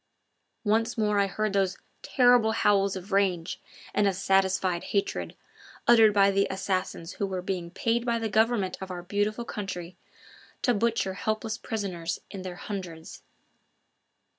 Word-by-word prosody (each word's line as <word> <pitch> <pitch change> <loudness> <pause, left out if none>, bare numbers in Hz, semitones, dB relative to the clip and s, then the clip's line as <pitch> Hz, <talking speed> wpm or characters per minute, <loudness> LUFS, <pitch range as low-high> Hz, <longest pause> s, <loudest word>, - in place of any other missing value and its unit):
Once 225 +2 +1
more 210 -2 +2
I 200 - +3
heard 215 +2 -2
those 195 -2 +1 0.2
terrible 245 -4 +4
howls 200 -3 +2
of 190 +2 -8
rage 190 -3 +1 0.3
and 205 - +3
of 195 - +1
satisfied 190 -2 +1
hatred, 200 -1 -2 0.5
uttered 225 -2 +7
by 200 -1 +4
the 195 0 +2
assassins 185 -3 -2
who 200 - -2
were 185 -2 -4
being 180 -2 -3
paid 230 +6 0
by 235 -1 0
the 225 -1 -2
government 220 -3 +1
of 190 - -6
our 175 -1 -6
beautiful 205 +5 -1
country 185 -5 -5 0.7
to 245 - +4
butcher 225 -3 0
helpless 215 +2 -2
prisoners 180 -6 -3
in 195 - -6
their 185 -1 -6
hundreds. 175 -5 -7
200 Hz, 145 wpm, -27 LUFS, 185-220 Hz, 0.7 s, uttered